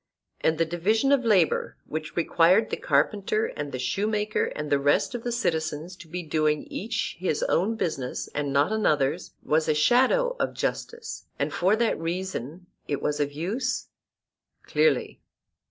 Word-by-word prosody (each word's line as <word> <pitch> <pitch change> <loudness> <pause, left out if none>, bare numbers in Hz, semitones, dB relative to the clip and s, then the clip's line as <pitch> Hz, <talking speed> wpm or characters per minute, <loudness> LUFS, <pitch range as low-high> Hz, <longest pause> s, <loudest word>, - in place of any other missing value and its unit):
And 160 0 +1
the 165 - +2
division 205 - +1
of 275 -2 +4
labour 190 -7 +2
which 155 0 -5
required 175 +5 +3
the - - +1
carpenter 195 +9 +1
and 145 -1 -4
the - - -3
shoemaker 210 - 0
and 150 0 -4
the 145 - +4
rest 145 - +2
of 240 -2 -5
the 240 - -2
citizens 160 -6 -2
to 165 - -12
be 175 +2 -5
doing 155 -1 +1
each 220 +1 -3
his 170 -5 0
own 205 +6 +1
business, 135 - -3
and 145 -1 -2
not 140 +6 +2
another's, 150 -11 0
was 155 +1 +1
a 155 - +3
shadow 265 - +3
of - - -1
justice, 470 -1 -4
and - - -1
for 190 +4 +3
that 230 0 +1
reason 175 -2 -4 0.2
it 145 - -1
was 150 0 -1
of 145 -1 0
use? 200 - -2 0.7
Clearly. 470 - +1
170 Hz, 160 wpm, -26 LUFS, 150-220 Hz, 0.7 s, of